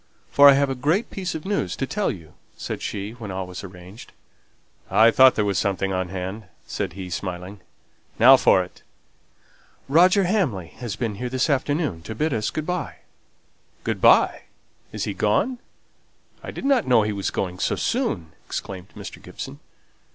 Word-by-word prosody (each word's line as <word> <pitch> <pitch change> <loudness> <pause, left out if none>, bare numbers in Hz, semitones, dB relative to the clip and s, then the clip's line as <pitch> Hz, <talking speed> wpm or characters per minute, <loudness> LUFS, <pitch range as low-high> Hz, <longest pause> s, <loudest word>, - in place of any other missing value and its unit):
for 140 0 +8
I - - +8
have 140 +1 +2
a - - 0
great 155 - 0
piece 185 -4 -4
of 160 - -6
news 190 - -1
to 135 - -2
tell 205 +8 -1
you!" 80 -4 -8 0.2
said - - -5
she, 100 +1 -4
when 115 -3 -9
all 95 0 -4
was 90 +1 -8
arranged. 95 +3 -12 0.8
"I 115 +1 +6
thought 130 +2 +6
there 105 - +1
was 100 -3 0
something 95 -1 -1
on 95 -1 -2
hand," 95 +3 -5 0.2
said 95 -5 -4
he, 95 -1 -7
smiling. 90 +2 -5 0.6
"Now - - +9
for - - +4
it!" - - -15 1.1
"Roger 180 +7 +5
Hamley 155 - 0
has 120 -5 -5
been 115 -4 -2
here 125 - -2
this 130 +4 0
afternoon 145 - -1
to 110 +6 -7
bid 155 +5 0
us 110 -2 -1
good 155 - -4
by." 180 +1 -3 0.9
"Good - - -2
by! - - +4 0.5
Is - - -4
he - - -2
gone? 255 -1 0 0.8
I - - -8
didn't 270 -4 0
know 120 -4 +5
he 105 0 -1
was 100 -1 -2
going 90 -1 -3
so - - 0
soon!" 80 -2 -2 0.2
exclaimed 95 -2 -6
Mr. - - -9
Gibson. 70 - -8
110 Hz, 175 wpm, -23 LUFS, 95-145 Hz, 1.1 s, Now